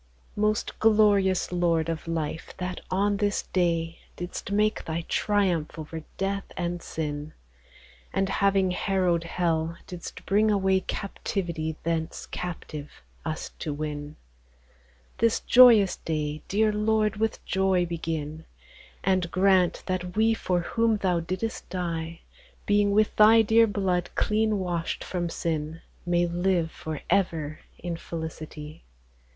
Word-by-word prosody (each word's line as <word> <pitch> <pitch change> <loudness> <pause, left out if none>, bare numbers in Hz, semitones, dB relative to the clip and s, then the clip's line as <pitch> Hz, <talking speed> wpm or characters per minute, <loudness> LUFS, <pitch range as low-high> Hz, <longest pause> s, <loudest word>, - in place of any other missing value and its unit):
Most 210 0 0
glorious 205 -4 +4
Lord 170 -2 +1
of 165 0 -4
lyfe 160 -1 -4
that 180 0 -4
on 200 +2 +1
this 205 0 0
Day, 165 -2 0 0.2
Didst 175 +2 -6
make 210 +1 +1
Thy 165 +1 -3
Triumph 180 -7 +1
over 160 +1 -6 0.2
Death 195 0 -1
and 175 -1 -2
Sin; 150 -2 -4 0.8
And, 195 0 +1
having 195 -1 +2
harrow'd 180 -3 +1
Hell, 165 -1 -1
didst 180 -1 -8
bring 210 +2 +3
away 190 -2 +3
Captivity 175 -5 -3
thence 165 -1 -2
Captive, 160 -4 -7 0.2
us 160 -1 -3
to 150 -2 -3
win: 150 0 -5 1.0
This 230 0 +3
joyous 235 -6 +7
Day, 150 -1 -3
deare 215 +2 +2
Lord, 215 0 +1
with 220 0 -1
Joy 190 -1 +2
begin; 160 -2 -4 0.6
And 185 -2 +1
grant 185 -1 +3
that 180 -1 -3
wee 225 +1 +4
for 180 -5 0
whom 225 +4 +1
thou 185 -4 +1
dicldest 185 +7 -4
dy, 165 -2 -3 0.4
Being 205 0 +3
with 210 +1 +2
Thy 220 +1 +7
deare 225 +1 +5
Blood 190 -4 0
clene 215 0 +1
washt 175 -3 -2
from 175 -2 -2
Sin, 160 -1 -3 0.3
May 175 0 +3
live 175 -1 0
for 155 -2 -6
ever 160 -6 0 0.2
in 175 -1 -4
felicity 155 -2 -7
180 Hz, 125 wpm, -27 LUFS, 165-200 Hz, 1.0 s, joyous